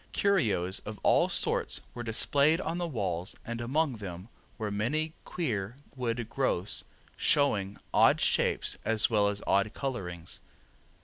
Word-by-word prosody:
Curios 110 - +1
of 110 0 -8
all - - +4
sorts - - +1
were 120 - -6
displayed 140 +7 +3
on 170 0 -3
the 175 - -1
walls, 95 - -3
and 120 0 -4
among 135 +1 0
them 95 0 -8 0.3
were 110 -2 -3
many 150 +10 -1
queer 120 - -3 0.2
wood 120 -3 -2
growths 110 -7 0 0.3
showing 105 -9 +2 0.2
odd - - +5
shapes - - +2
as 110 +1 +3
well 105 -2 +3
as 100 0 -2
odd 100 +2 +2
colorings. 90 -11 -4
115 Hz, 135 wpm, -30 LUFS, 100-140 Hz, 0.3 s, odd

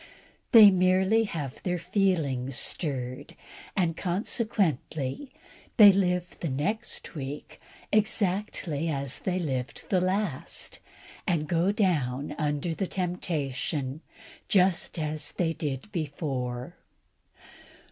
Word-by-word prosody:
They 215 -4 +10
merely 190 +4 +3
have 145 -9 -5
their 180 -1 -1
feelings 165 - 0
stirred, 130 -3 -1 0.4
and, 170 -4 +1
consequently, 180 - -1 0.5
they 210 -3 +10
live 180 -2 0
the 165 - -2
next 205 - -2
week 140 -1 -7 0.3
exactly 195 -7 0
as 140 -3 -1
they 185 -1 -1
lived 130 -8 -3
the 185 -2 +3
last, 185 -6 -2 0.5
and 155 -4 +1
go 170 +5 +2
down 150 - 0
under 150 +2 -1
the 185 +4 -2
temptation 155 -6 -2 0.5
just 185 -5 +2
as 155 -2 -2
they 165 -2 0
did 145 +5 -4
before. 135 - -4
165 Hz, 100 wpm, -28 LUFS, 140-190 Hz, 0.5 s, They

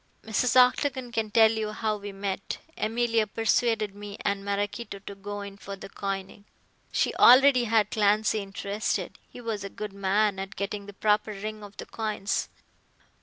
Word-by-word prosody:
Mrs. 220 +2 +1
Octagon 255 0 +3
can 225 -2 -1
tell 220 0 +6
you 220 -1 -2
how 215 0 -1
we 205 0 -7
met. 195 0 -4 0.2
Emilia 230 0 +1
persuaded 225 -1 +1
me 205 0 -8
and 200 0 -1
Maraquito 200 +2 -3
to 200 +1 -9
go 205 +1 -6
in 200 0 -8
for 200 0 -7
the 195 - -10
coining. 195 0 -5 0.5
She - - +1
already 255 0 +7
had 220 -2 +2
Clancy 215 +1 +2
interested. 200 +1 -3
He - - -11
was 220 -4 -3
a 200 - -5
good 210 0 -6
man 200 +1 +1
at 195 +1 -6
getting 200 0 -4
the 205 - -9
proper 210 +1 +1
ring 215 +1 -6
of 205 -1 -12
the - - -6
coins. 215 -3 -2
210 Hz, 170 wpm, -27 LUFS, 200-220 Hz, 0.5 s, already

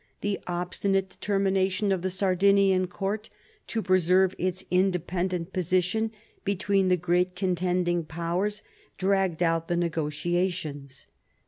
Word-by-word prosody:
The 205 -1 -1
obstinate 185 +2 -1
determination 195 0 0
of 190 -2 +1
the 185 - -1
Sardinian 190 0 +3
court 200 +4 -3 0.4
to 225 -2 -2
preserve 185 0 +3
its 185 +1 -2
independent 180 -1 0
position 185 +5 +1 0.3
between 195 -1 +1
the 180 0 +3
great 180 +1 +1
contending 180 -2 0
Powers, 175 +6 -2 0.3
dragged 190 -3 +1
out 165 -1 +1
the 175 - 0
negotiations. 160 -3 -2
185 Hz, 110 wpm, -27 LUFS, 175-195 Hz, 0.4 s, Sardinian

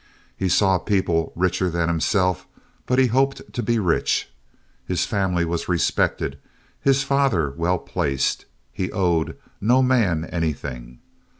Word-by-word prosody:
He 95 - -1
saw 95 0 +3
people 85 -4 0
richer 90 +1 +1
than 85 -1 0
himself, 90 +2 +1 0.4
but 125 - +1
he 130 - +5
hoped 135 +3 0
to 120 - -2
be 115 +1 +1
rich. 90 -6 0 0.5
His 90 -2 -1
family 95 -5 0
was 85 +1 -3
respected, 90 -2 0 0.4
his 135 0 +3
father 135 - +1
well 85 +5 0
placed. 70 -5 -1 0.3
He 95 - -3
owed 90 -5 0 0.2
no 125 +5 +4
man 105 -11 +2
anything. 70 -8 -4
90 Hz, 130 wpm, -23 LUFS, 85-110 Hz, 0.5 s, he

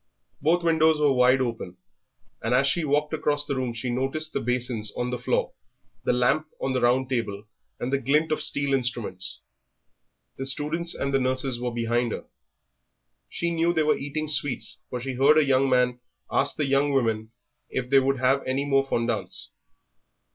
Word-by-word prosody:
Both 170 +4 +2
windows 160 -2 +3
were 145 -2 +4
wide 125 +1 +4
open, 115 -7 -4 0.6
and - - +1
as 135 - +4
she 165 +4 +1
walked 150 +1 0
across 145 -1 0
the 145 -2 -2
room 130 -2 -2
she 120 +2 -3
noticed 135 +5 -2
the - - 0
basins 120 -3 -1
on 125 0 -2
the 125 - -3
floor, 125 - -1 0.5
the - - +3
lamp 125 +6 +2
on 135 - -1
the 130 - 0
round 125 +2 +2
table, 110 -6 -3 0.4
and 125 +3 -3
the 140 - +2
glint 150 +5 +1
of 155 - 0
steel 140 -1 +1
instruments. 120 -8 -3 1.0
The 135 - -2
students 155 +5 0
and 140 0 -2
the 135 - +3
nurses 130 -1 0
were 125 0 -2
behind 120 0 -1
her; - - -6 1.0
she 170 0 -2
knew 170 +1 +1
they 160 - +3
were 155 - +3
eating 145 +2 -4
sweets, 145 -3 -1
for 125 - -4
she 130 +2 -4
heard 140 +4 +4
a 155 - +5
young 135 0 +3
man 125 -1 +2 0.3
ask 140 - +2
the 150 - 0
young 140 +1 +2
women 110 -4 0 0.4
if 130 -1 -3
they 135 - +7
would 135 +1 +1
have 130 +2 +2
any 135 +2 0
more 135 -1 +2
fondants. 115 -3 -2
135 Hz, 185 wpm, -25 LUFS, 125-145 Hz, 1.0 s, they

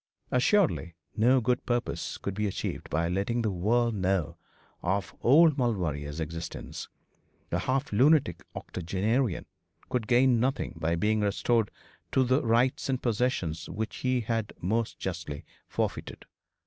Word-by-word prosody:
Assuredly 125 - +2 0.2
no 125 +4 +4
good 125 +2 +1
purpose 120 -1 -1
could 100 - -4
be 105 +1 -1
achieved 95 - -4
by 85 +2 +1
letting 100 +7 0
the 110 - +1
world 115 +6 +1
know 95 -4 0 0.5
of 95 +3 -1
old 150 +3 +6
Lord 120 -3 +2
Maulevrier's 75 -3 -3
existence. 80 +1 -6 0.6
A - - +1
half 130 -3 -1
lunatic 130 - +4
octogenarian 100 +5 -1 0.4
could 120 -4 -1
gain 125 0 +4
nothing 130 +3 0
by 85 +1 0
being 105 +5 +1
restored 105 +2 +1 0.4
to 130 - +4 0.2
rights 120 +3 +1
and 130 -2 +1
possessions 105 -10 -1
which 110 +5 -4
he 130 -1 +1
had 115 -1 -2
most 110 +5 -1
justly 85 -6 -5 0.2
forfeited. - - -3
110 Hz, 135 wpm, -29 LUFS, 90-125 Hz, 0.6 s, old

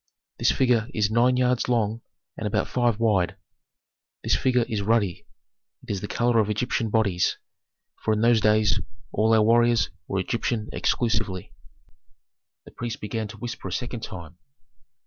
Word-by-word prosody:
This - - +3
figure 120 -3 +2
is 105 -1 +1
nine 125 +3 +3
yards 125 -1 +1
long 115 -1 0 0.3
and - - -3
about - - 0
five 120 -3 +1
wide. 100 -4 +2 0.9
This - - +2
figure 125 -2 +2
is 110 -2 -2
ruddy; 100 -4 0 0.6
it - - -15
has 100 -2 -2
the 105 - -4
color 120 +1 +2
of 110 -1 +1
Egyptian 110 +1 -1
bodies, 100 -5 +1 0.7
for 110 - +1
in 105 0 +1
those 115 -1 +4
days 105 -4 +3 0.3
all 110 +2 +2
our 110 -1 +5
warriors 120 +1 +3 0.2
were - - -2
Egyptian 110 -2 -2
exclusively." 105 -6 -1 1.1
The - - -13
priests 120 -1 -5
began 110 +1 -3
to 105 +1 -11
whisper 115 -2 -6
a - - -6
second 120 +4 -4
time. 85 -4 -9
110 Hz, 155 wpm, -25 LUFS, 105-120 Hz, 1.1 s, our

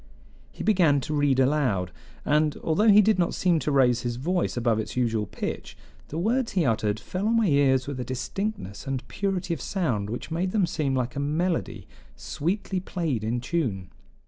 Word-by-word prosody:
He - - -7
began 175 -9 +4
to 155 - -4
read 145 -3 +2
aloud, 130 - +1 0.3
and, 150 0 +2
although 195 +8 +2
he 210 0 +8
did 215 -1 +3
not 175 - +1
seem 175 -3 +2
to 150 - -1
raise 125 -3 +3
his 120 -1 -3
voice 170 +4 -1
above 115 -2 +1
its 110 - -5
usual 115 -4 0
pitch, - - -5 0.3
the 155 - -6
words 230 +7 0
he 180 -5 +2
uttered 110 -3 0
fell 185 - -3
on 230 +1 +3
my 230 - +3
ears 140 -5 +3
with 140 -2 -5
a - - -2
distinctness 130 - -4
and 135 -1 -3
purity 190 -3 -2
of 150 - -5
sound 120 - -1
which 120 +7 -6
made 180 +3 -1
them 205 -4 +3
seem 140 -5 -1
like 125 -2 -2
a - - -2
melody 160 +5 -1 0.3
"sweetly 185 +4 -2
played 165 - -2
in 120 +2 -1
tune." 115 - -2
145 Hz, 190 wpm, -26 LUFS, 125-180 Hz, 0.3 s, he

